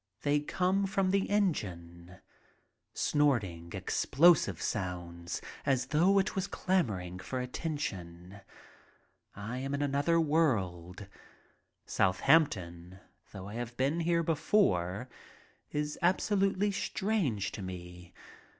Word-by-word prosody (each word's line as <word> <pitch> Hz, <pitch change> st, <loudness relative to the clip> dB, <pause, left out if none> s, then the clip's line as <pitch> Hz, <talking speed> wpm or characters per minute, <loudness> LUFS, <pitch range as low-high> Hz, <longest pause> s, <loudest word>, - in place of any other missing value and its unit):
They 145 Hz, 0 st, +3 dB
come 185 Hz, +6 st, 0 dB
from 190 Hz, -1 st, +1 dB
the 195 Hz, 0 st, +1 dB
engine 90 Hz, -, -2 dB, 0.3 s
— -, -, -43 dB
snorting, 105 Hz, -, +1 dB
explosive 140 Hz, -, +3 dB
sounds, 90 Hz, -4 st, -4 dB, 0.2 s
as 130 Hz, -2 st, +1 dB
though 180 Hz, +6 st, +4 dB
it 195 Hz, -, +1 dB
was 190 Hz, 0 st, -1 dB
clamoring 100 Hz, -, -1 dB
for 110 Hz, +8 st, -4 dB
attention. 100 Hz, -, -5 dB, 1.0 s
I 110 Hz, +5 st, -5 dB
am 135 Hz, +2 st, -2 dB
in 145 Hz, -, -1 dB
another 145 Hz, +4 st, +2 dB
world. 100 Hz, -, 0 dB, 0.8 s
Southampton, 95 Hz, -, +1 dB, 0.3 s
though 95 Hz, 0 st, -8 dB
I 105 Hz, -, -8 dB
have 120 Hz, +1 st, -5 dB
been 140 Hz, +6 st, +1 dB
there 170 Hz, 0 st, +1 dB
before, 130 Hz, -, +1 dB, 0.6 s
is 150 Hz, 0 st, -3 dB
absolutely 195 Hz, +2 st, +2 dB
strange 190 Hz, -, -1 dB
to -, -, -7 dB
me. 90 Hz, -1 st, -8 dB
130 Hz, 105 wpm, -31 LUFS, -, 1.0 s, though